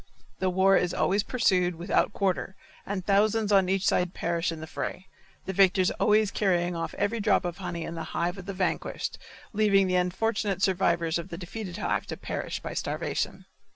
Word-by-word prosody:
The 185 - +1
war 190 +1 +4
is 180 0 0
always 200 +2 +2
pursued 185 -7 +1
without 170 +5 +1
quarter 190 -1 -1 0.3
and 195 -2 -3
thousands 210 +1 +2
on 195 -2 +4
each 195 0 +1
side 180 -1 +1
perish 170 0 -1
in 165 - -6
the 160 - -6
fray, 185 +3 -5 0.4
the 190 - -3
victors 190 -1 +4
always 215 -1 +3
carrying 175 -3 +1
off 165 0 -4
every 215 +3 0
drop 205 -3 +2
of 175 -1 -3
honey 175 -3 -4
in 165 - -5
the 165 -1 -5
hive 175 +3 -1
of 190 - -10
the 200 - -3
vanquished, 190 0 -2 0.3
leaving 200 -2 +4
the 185 -1 +1
unfortunate 195 +1 0
survivors 170 -3 +2
of 170 - -7
the 170 - -6
defeated 185 +1 -6
hive 210 - -1
to - - -5
perish - - -4
by - - -5
starvation. - - -3
190 Hz, 190 wpm, -27 LUFS, 175-200 Hz, 0.4 s, war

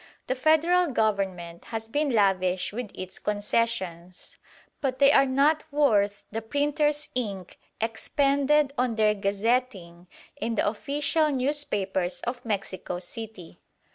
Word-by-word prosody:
The - - 0
Federal 320 +6 +3
Government 195 - -1
has 225 -1 -5
been 290 +5 0
lavish 190 -5 +1
with 240 -1 -4
its 185 0 -7
concessions; 205 -4 -2 0.5
but 265 -3 -1
they 280 +1 +6
are 275 -1 +5
not 285 +4 +3
worth 205 -9 +2
the 225 +2 -3
printer's 295 +4 0
ink 200 -7 -4 0.2
expended 280 +5 +1
on 250 -2 +1
their 215 -1 +3
gazetting 200 -3 -1 0.3
in 230 -5 -2
the - - +1
official 290 +8 0
newspapers 210 -10 -1
of 245 +1 -4
Mexico 195 -4 -3
City. 185 0 -9
225 Hz, 120 wpm, -26 LUFS, 195-280 Hz, 0.5 s, they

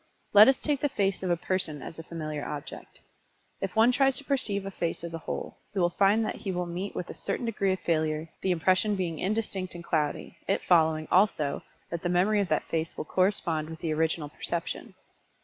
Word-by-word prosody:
Let 210 +1 +10
us 265 0 +4
take 290 -2 0
the 290 - +2
face 195 -7 0
of 185 - -2
a 175 - +2
person 180 -4 0
as 165 - -8
a - - -6
familiar 155 -3 -5
object. 145 -1 -7 0.6
If 195 -1 -3
one 225 +3 +6
tries 270 +1 +3
to - - +4
perceive 210 -8 0
a 195 - -4
face 170 -3 -3
as 170 -1 -6
a 165 - -4
whole, - - -5
he 200 - -1
will 175 -1 +3
find 205 +5 +3
that - - -3
he 195 - -4
will 180 -1 -2
meet 175 +4 -5
with 180 - -4
a - - -7
certain 245 - -3
degree 200 -4 0
of 185 - -1
failure, 155 -1 0
the 190 - 0
impression 185 +4 +2
being 170 -5 -2
indistinct 195 -3 -2
and 170 - -7
cloudy, 150 -3 -1
it - - +1
following, 160 -3 +3
also, 180 -7 +3 0.3
that 170 -1 -3
the 175 - -1
memory 190 +4 +3
of 200 - -1
that 155 - +1
face 165 0 -2
will - - -4
correspond 170 -4 +1
with 160 - -7
the 160 -2 -1
original 160 -1 0
perception. 170 +3 -4
180 Hz, 220 wpm, -28 LUFS, 160-200 Hz, 0.6 s, Let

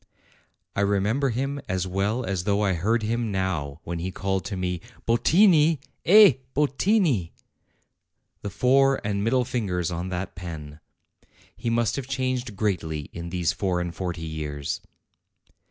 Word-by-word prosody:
I - - +1
remember 105 +7 +1
him 135 +4 -2
as 95 0 0
well 100 +6 -1
as 95 -2 -2
though 100 0 +2
I 95 -2 +2
heard 110 +7 +1
him 115 0 -1
now 85 -7 -2
when 85 0 -4
he 90 +3 -3
called 95 0 -2
to 100 -2 -4
me: 90 -2 -2 0.2
'Bottini! 160 - +4 0.3
eh, 200 - +8 0.2
Bottini! 145 - +2 1.1
The 100 - -4
fore 135 +7 +3
and 100 -1 -1
middle 125 +3 +2
fingers 90 -9 -2
on 85 +2 -3
that 90 +1 -4
pen!' 80 -4 -8 0.8
He 115 - -3
must 115 +1 +1
have 135 -2 -4
changed 130 -4 -2
greatly 80 -8 -2
in 85 0 -6
these 85 -1 0
four 95 -3 -1
and 85 -1 -3
forty 90 -3 -4
years." 75 -3 -4
100 Hz, 145 wpm, -25 LUFS, 90-125 Hz, 1.1 s, eh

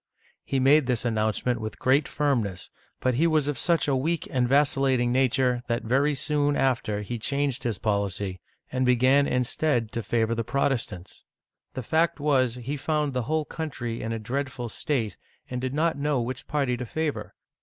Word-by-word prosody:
He 135 - -1
made 135 +1 +5
this 125 -2 0
announcement 110 +1 0
with 110 -1 -5
great 140 +3 +2
firmness, 120 -11 -1 0.3
but 130 - +2
he 155 +8 +3
was 155 -3 +2
of 145 -5 -2
such 170 +1 +2
a 140 - +2
weak 160 +5 -1
and 125 -2 +1
vacillating 135 -3 +2
nature 125 -1 +2
that 120 0 -1
very 135 +5 +2
soon 145 0 +1
after 120 -6 0
he 120 +3 -5
changed 140 +2 -1
his 115 -4 -2
policy, 100 -3 -2 0.3
and 130 0 0
began, 130 +3 +4
instead, 125 -2 0
to 115 - -3
favor 115 +2 0
the 115 0 -1
Prot 140 +4 +1
estants. 95 -8 -5 0.5
The 130 - -4
fact 160 +6 +1
was 130 -5 +2
that 125 - -8
he 140 +5 -3
found 150 0 -1
the 125 - 0
whole 155 -1 +1
country 130 -9 -5
in 115 - -3
a 115 - -2
dreadful 125 +1 -3
state, 115 -5 -2 0.3
and 125 -1 -3
did 130 +1 -3
not 160 -1 +1
know 145 -2 +1
which 125 +2 -4
party 135 -5 0
to 125 - -4
favor. 155 +3 -3
130 Hz, 185 wpm, -26 LUFS, 115-145 Hz, 0.5 s, made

